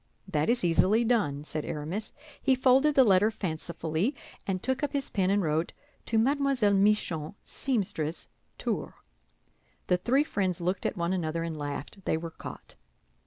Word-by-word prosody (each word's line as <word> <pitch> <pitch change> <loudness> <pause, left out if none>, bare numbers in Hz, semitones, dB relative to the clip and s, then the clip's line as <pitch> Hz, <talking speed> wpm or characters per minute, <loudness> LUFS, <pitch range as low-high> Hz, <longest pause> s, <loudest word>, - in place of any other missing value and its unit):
"That 155 -3 0
is 240 -3 +2
easily 185 +6 +3
done," 205 -12 +1
said 155 0 -4
Aramis. 165 +8 -4 0.3
He 265 - +3
folded 265 +3 +4
the 265 - +7
letter 205 -1 +5
fancifully, 170 - -2 0.3
and 185 -2 -2
took 260 +2 0
up 290 - -1
his 280 -2 -2
pen 190 -2 +1
and 200 0 +2
wrote: 160 +1 0 0.3
"To 225 - +1
Mlle. 270 -3 +2
Michon, 195 -5 +1
seamstress, 180 - -2 0.3
Tours." - - -3 0.9
The 180 - +2
three 255 +10 +2
friends 190 - -1
looked 180 +2 -1
at - - -4
one 170 +1 0
another 165 -2 -1
and 165 -1 -4
laughed; 145 +6 -6
they - - +1
were 165 0 -6
caught. - - -9
190 Hz, 160 wpm, -29 LUFS, 165-235 Hz, 0.9 s, the